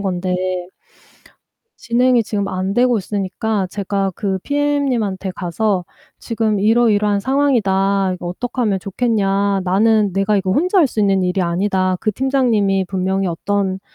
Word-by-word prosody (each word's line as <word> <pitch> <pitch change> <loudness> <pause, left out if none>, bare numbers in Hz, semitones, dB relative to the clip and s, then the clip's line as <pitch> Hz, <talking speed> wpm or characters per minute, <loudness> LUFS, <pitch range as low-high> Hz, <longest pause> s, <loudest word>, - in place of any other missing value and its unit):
건데 185 -2 -2 1.5
진행이 245 0 +2
지금 205 -2 -2
안 190 +1 -2
되고 245 0 +3
있으니까 200 +1 -2
제가 195 0 -2
그 195 -3 -2
PM님한테 275 -10 -1
가서 185 +1 -1 0.3
"지금 220 -3 -1
이러이러한 210 -2 +3
상황이다. 200 -7 +1
이거 180 -1 -8
어떡하면 215 +2 -2
좋겠냐. 200 -1 0
나는 205 +2 +2
내가 195 +2 +1
이거 190 -1 0
혼자 365 - +2
할 320 - +5
수 230 - -3
있는 195 -2 +2
일이 180 +1 0
아니다." 185 +1 0
그 215 - 0
팀장님이 225 -7 +1
분명히 190 +1 -1
어떤 190 +2 -2
200 Hz, 305 characters per minute, -18 LUFS, 190-230 Hz, 1.5 s, 할